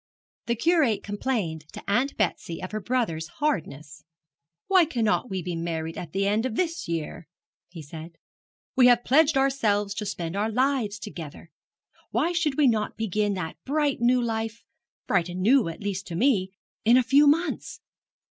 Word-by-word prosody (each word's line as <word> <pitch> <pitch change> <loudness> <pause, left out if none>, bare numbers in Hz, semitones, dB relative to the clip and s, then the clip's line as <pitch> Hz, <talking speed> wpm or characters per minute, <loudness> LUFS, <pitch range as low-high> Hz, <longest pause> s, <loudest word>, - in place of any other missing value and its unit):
The 235 - +1
Curate 280 - +2
complained 205 -7 -2
to - - -9
Aunt 245 +7 +1
Betsy 175 -4 -1
of 185 - -5
her 215 - -2
brother's 190 -8 -1
hardness. 155 - -3 0.6
'Why 375 -2 +5
cannot 245 -5 0
we 190 -2 -3
be 175 0 -3
married 165 -1 -3
at 170 -3 -7
the 195 +3 0
end 210 +3 +1
of 255 -3 -2
this 335 +1 -2
year?' 165 -1 -4 0.4
he 170 -3 -9
said. 160 +3 -9 0.6
'We 255 -2 +6
have 240 -1 +5
pledged 295 +2 +4
ourselves 215 -7 +1
to 210 0 -4
spend 170 -3 -4
our 210 +2 0
lives 250 -4 0
together. 165 -6 -9 0.6
Why 340 - +1
should 330 -5 0
we 300 - +4
not 220 -4 +1
begin 210 -1 0
that 160 -4 -5
bright 290 0 0
new 250 +1 +4
life 225 0 -3 0.4
bright 180 -3 +1
and 180 +1 -5
new, 240 +2 +4
at 165 - -8
least 195 -2 -3
to 170 - -5
me 205 -3 +2 0.3
in 235 +3 +6
a 255 - +4
few 280 +4 +5
months? 330 +5 0
215 Hz, 170 wpm, -26 LUFS, 180-265 Hz, 0.6 s, We